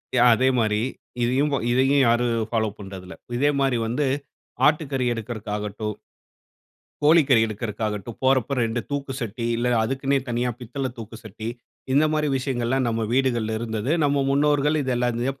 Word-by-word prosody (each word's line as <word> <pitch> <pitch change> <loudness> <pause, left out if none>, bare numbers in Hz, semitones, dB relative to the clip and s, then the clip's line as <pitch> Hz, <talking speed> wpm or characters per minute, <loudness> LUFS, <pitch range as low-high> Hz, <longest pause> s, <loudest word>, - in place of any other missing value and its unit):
யா. 120 - +5
அதே 130 +3 +2
மாரி 105 -2 +1 0.4
இதையும் 130 +5 +2
போ 140 - +1
இதையும் 135 +3 +3
யாரும் 115 -1 +1
ஃபாலோ 110 -2 0
பண்றதில்ல. 95 -2 -9 0.2
இதே 145 +3 +3
மாரிவந்து 125 0 +1 0.6
ஆட்டுக்கறி 145 -4 +1
எடுக்கறகாகட்டும், 105 -2 -4 1.1
கோழிக்கறி 145 -5 +5
எடுக்கறகாகட்டும், 110 0 -4
போறப்போ 130 -1 +2
2 115 +1 -1
தூக்குசட்டி, 130 -5 -3
இல்ல 125 +1 +1
அதுக்குன்னே 135 +3 0
தனியா 120 +1 0
பித்தள 130 +2 -4
தூக்குசட்டி, 110 -1 -8 0.5
இந்த 145 +3 +5
மாரி 150 -1 +1
விஷயங்கள்லாம் 130 -1 0
நம்ம 115 -1 -1
வீடுகள்ல 120 -4 +1
இருந்தது. 110 +1 -3
நம்ம 140 -1 +2
முன்னோர்கள் 145 +1 +2
இத 130 -2 -1
எல்லாத்தையும் 125 +2 -1
120 Hz, 130 wpm, -24 LUFS, 110-135 Hz, 1.1 s, யா